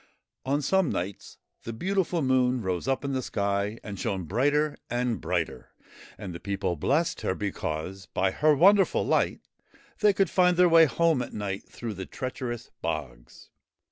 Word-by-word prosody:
On 145 Hz, +2 st, +1 dB
some 190 Hz, 0 st, +2 dB
nights 95 Hz, +3 st, -5 dB, 0.2 s
the 115 Hz, -, -6 dB
beautiful 180 Hz, -, 0 dB
Moon 130 Hz, -2 st, +2 dB
rose 95 Hz, +3 st, -2 dB
up 135 Hz, +1 st, 0 dB
in 140 Hz, -, -1 dB
the 130 Hz, -, 0 dB
sky 100 Hz, -1 st, -1 dB
and 100 Hz, -3 st, -7 dB
shone 95 Hz, -2 st, -2 dB
brighter 145 Hz, -, +1 dB
and 120 Hz, -1 st, -1 dB
brighter, -, -, -3 dB, 0.4 s
and 100 Hz, -4 st, -7 dB
the 85 Hz, -, -7 dB
people 95 Hz, -2 st, -2 dB
blessed 145 Hz, -, 0 dB
her 95 Hz, -, -1 dB
because 95 Hz, -1 st, -4 dB
by 95 Hz, 0 st, 0 dB
her 150 Hz, +7 st, +3 dB
wonderful 195 Hz, +5 st, +4 dB
light -, -, +1 dB, 0.6 s
they 210 Hz, -1 st, +5 dB
could 195 Hz, 0 st, +1 dB
find 180 Hz, -1 st, +3 dB
their 180 Hz, 0 st, +6 dB
way 165 Hz, -1 st, +7 dB
home 160 Hz, +1 st, +2 dB
at -, -, -6 dB
night 100 Hz, -2 st, -4 dB
through 115 Hz, -2 st, -6 dB
the 95 Hz, -1 st, -7 dB
treacherous 125 Hz, -2 st, -5 dB
bogs. 70 Hz, -7 st, -6 dB
120 Hz, 165 wpm, -27 LUFS, 95-155 Hz, 0.6 s, way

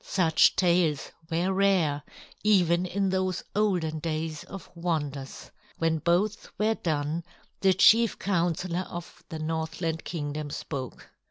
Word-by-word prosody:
Such 165 Hz, -5 st, +3 dB
tales 170 Hz, -5 st, +2 dB, 0.2 s
were 175 Hz, +3 st, 0 dB
rare, 185 Hz, -7 st, +2 dB, 0.4 s
even 180 Hz, -4 st, +3 dB
in 195 Hz, +1 st, 0 dB
those 185 Hz, -1 st, -1 dB
olden 180 Hz, -7 st, +1 dB
days 155 Hz, -1 st, -3 dB
of 195 Hz, -2 st, -9 dB
wonders. 145 Hz, -6 st, -4 dB, 0.3 s
When 165 Hz, -1 st, +1 dB
both 180 Hz, +7 st, 0 dB
were 215 Hz, +1 st, +2 dB
done, 155 Hz, -3 st, -2 dB, 0.4 s
the 190 Hz, -2 st, +4 dB
Chief 225 Hz, +4 st, +5 dB
Counselor 175 Hz, -1 st, -1 dB
of 175 Hz, -1 st, -9 dB
the 160 Hz, -, -5 dB
Northland 160 Hz, +1 st, -3 dB
Kingdom 150 Hz, -2 st, -4 dB
spoke. 135 Hz, -3 st, -6 dB
170 Hz, 120 wpm, -27 LUFS, 155-185 Hz, 0.4 s, Chief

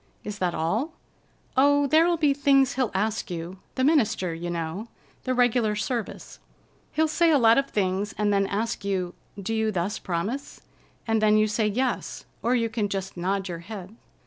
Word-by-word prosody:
"Is 210 Hz, -1 st, -6 dB
that 180 Hz, -2 st, 0 dB
all?" 220 Hz, -, -1 dB, 0.6 s
"Oh, 285 Hz, +2 st, +4 dB
there'll 325 Hz, +4 st, +4 dB
be 300 Hz, -3 st, +3 dB
things 275 Hz, -2 st, +3 dB
he'll 255 Hz, -3 st, 0 dB
ask 215 Hz, +2 st, -1 dB
you—the 180 Hz, +8 st, -5 dB
minister, 225 Hz, -, +2 dB
you 170 Hz, +2 st, -5 dB
know. 170 Hz, +5 st, -4 dB, 0.4 s
The 255 Hz, -1 st, 0 dB
regular 245 Hz, -3 st, +2 dB
service. 225 Hz, +1 st, -4 dB, 0.5 s
He'll 315 Hz, +1 st, +2 dB
say 335 Hz, +2 st, +3 dB
a 305 Hz, -, +5 dB
lot 230 Hz, -1 st, +6 dB
of 275 Hz, -, -2 dB
things, 195 Hz, 0 st, -1 dB
and 210 Hz, -1 st, +2 dB
then 195 Hz, -1 st, +2 dB
ask 215 Hz, +1 st, -2 dB
you, 185 Hz, -3 st, -1 dB, 0.3 s
'Do 200 Hz, +3 st, -3 dB
you 220 Hz, -1 st, +1 dB
thus 185 Hz, +1 st, -2 dB
promise?' 200 Hz, +10 st, -3 dB, 0.5 s
And 225 Hz, -1 st, +1 dB
then 215 Hz, 0 st, +5 dB
you 215 Hz, -, +4 dB
say, 215 Hz, 0 st, 0 dB
'Yes,' 250 Hz, +5 st, -2 dB, 0.2 s
or 245 Hz, +2 st, +2 dB
you 230 Hz, -2 st, +1 dB
can 220 Hz, -2 st, -2 dB
just 195 Hz, -1 st, -4 dB
nod 190 Hz, +2 st, -1 dB
your 170 Hz, -2 st, -5 dB
head." 195 Hz, +2 st, -9 dB
215 Hz, 175 wpm, -26 LUFS, 190-255 Hz, 0.6 s, lot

